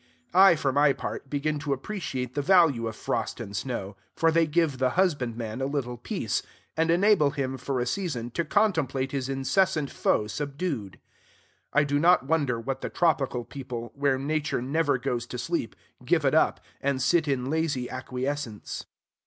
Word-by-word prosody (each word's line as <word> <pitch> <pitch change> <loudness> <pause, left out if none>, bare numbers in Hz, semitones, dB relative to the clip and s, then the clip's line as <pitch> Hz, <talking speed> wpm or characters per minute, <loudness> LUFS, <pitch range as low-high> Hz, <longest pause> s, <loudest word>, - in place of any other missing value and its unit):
I, 190 -1 +8
for 145 -4 0
my 145 0 +4
part, 135 - -6
begin 150 +1 -1
to 145 -1 -1
appreciate 135 - -4
the 145 - -1
value 145 -8 +4
of 110 - -5
frost - - -2
and 100 - -6
snow; 100 -2 -4 0.2
for 165 0 +3
they 165 0 +3
give 155 -4 +1
the 130 -1 +1
husbandman 125 - 0
a 135 - 0
little 135 -4 -2
peace, 120 - -2 0.3
and 160 +1 +1
enable 175 -3 +4
him, 135 -2 -2
for 130 0 -2
a 120 - 0
season, 125 -6 -3
to 170 - -1
contemplate 160 - +1
his 135 -2 -2
incessant 150 +3 +1
foe 105 - +1
subdued. 140 - -4 0.7
I 150 - +4
do 145 0 +1
not 170 -3 +5
wonder 140 -6 0
that 135 0 -3
the - - -3
tropical 135 -7 +1
people, 120 -4 -6
where 140 -1 +1
Nature 150 +1 -1
never 140 +3 +1
goes 125 -2 -2
to - - -6
sleep, - - -2 0.3
give - - +2
it - - +3
up, - - +3 0.2
and 140 -1 0
sit 155 +4 +2
in 135 -1 -1
lazy 155 -6 0
acquiescence. 130 -2 -4
140 Hz, 170 wpm, -27 LUFS, 125-160 Hz, 0.7 s, I